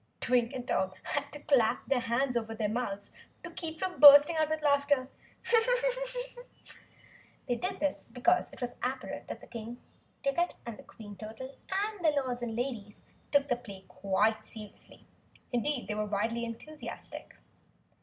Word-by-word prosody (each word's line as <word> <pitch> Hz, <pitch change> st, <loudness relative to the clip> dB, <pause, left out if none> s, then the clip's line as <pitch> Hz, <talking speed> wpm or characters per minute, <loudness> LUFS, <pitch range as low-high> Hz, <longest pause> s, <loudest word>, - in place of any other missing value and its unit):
Twink 245 Hz, -2 st, +2 dB
and 255 Hz, -2 st, -5 dB
Tom 190 Hz, 0 st, +1 dB
had 285 Hz, -1 st, -2 dB
to 295 Hz, -, -8 dB
clap 250 Hz, -7 st, +3 dB
their 270 Hz, -, +2 dB
hands 245 Hz, +2 st, 0 dB
over 225 Hz, -1 st, -1 dB
their 215 Hz, -1 st, 0 dB
mouths 205 Hz, -3 st, -3 dB, 0.3 s
to -, -, -7 dB
keep 320 Hz, -2 st, -5 dB
from 370 Hz, 0 st, -3 dB
bursting 290 Hz, +2 st, +10 dB
out 310 Hz, -1 st, +2 dB
with 315 Hz, -1 st, -2 dB
laughter. 285 Hz, -2 st, +3 dB, 2.4 s
They 245 Hz, -, +1 dB
did 370 Hz, +8 st, -3 dB
this 295 Hz, -1 st, -1 dB
because 305 Hz, +10 st, +2 dB
it -, -, -13 dB
was 245 Hz, -1 st, -2 dB
apparent 260 Hz, +1 st, -3 dB
that -, -, -8 dB
King 235 Hz, +1 st, -7 dB, 0.4 s
Ticket, 340 Hz, +6 st, +1 dB, 0.3 s
Queen 205 Hz, -2 st, -11 dB
Curtain, 220 Hz, +6 st, -8 dB, 0.2 s
and 405 Hz, 0 st, -1 dB
the 300 Hz, -3 st, +4 dB
Lords 250 Hz, -2 st, -3 dB
and 230 Hz, -2 st, -3 dB
Ladies 230 Hz, -5 st, -4 dB, 0.3 s
took 285 Hz, -1 st, +4 dB
the 245 Hz, -, +2 dB
play 200 Hz, -6 st, -11 dB
quite 210 Hz, +3 st, +1 dB
seriously. 215 Hz, -2 st, -9 dB, 0.5 s
Indeed, 245 Hz, +2 st, 0 dB
they 210 Hz, -, -1 dB
were 210 Hz, 0 st, -1 dB
wildly 225 Hz, +3 st, -1 dB
enthusiastic. 295 Hz, +7 st, -7 dB
250 Hz, 150 wpm, -31 LUFS, 220-290 Hz, 2.4 s, bursting